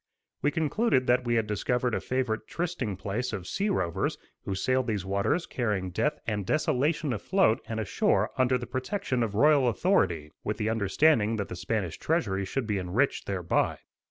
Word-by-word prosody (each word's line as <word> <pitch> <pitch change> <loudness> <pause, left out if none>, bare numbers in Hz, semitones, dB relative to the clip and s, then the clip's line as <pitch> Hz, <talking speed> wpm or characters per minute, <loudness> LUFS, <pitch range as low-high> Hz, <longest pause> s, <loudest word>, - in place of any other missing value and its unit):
We 145 - +3
concluded 160 - +1
that 125 +1 +2
we 120 0 +1
had 115 -2 +2
discovered 120 +4 0
a - - 0
favorite 125 -4 -2
trysting 160 - -3
place 105 +6 -3
of 95 -4 -4
sea 200 - -1
rovers 85 - -1 0.3
who 95 - -2
sailed 130 +6 +1
these 105 -4 -1
waters 100 - 0
carrying 105 -7 -2
death 150 +11 0
and 105 -3 -1
desolation 150 - +1
afloat 130 - +2
and 110 -1 -3
ashore 105 - +1
under 130 0 +3
the 120 - -6
protection 130 - -2
of 110 -3 -1
royal 145 +2 +5
authority, 95 - +1
with - - -2
the 110 - -1
understanding 110 +2 +3
that 100 -2 -3
the - - -5
Spanish 90 -2 -2
treasury 100 - 0
should 130 +5 -2
be 105 -3 -1
enriched 95 +10 0
thereby. 90 -4 0
115 Hz, 175 wpm, -28 LUFS, 100-140 Hz, 0.3 s, royal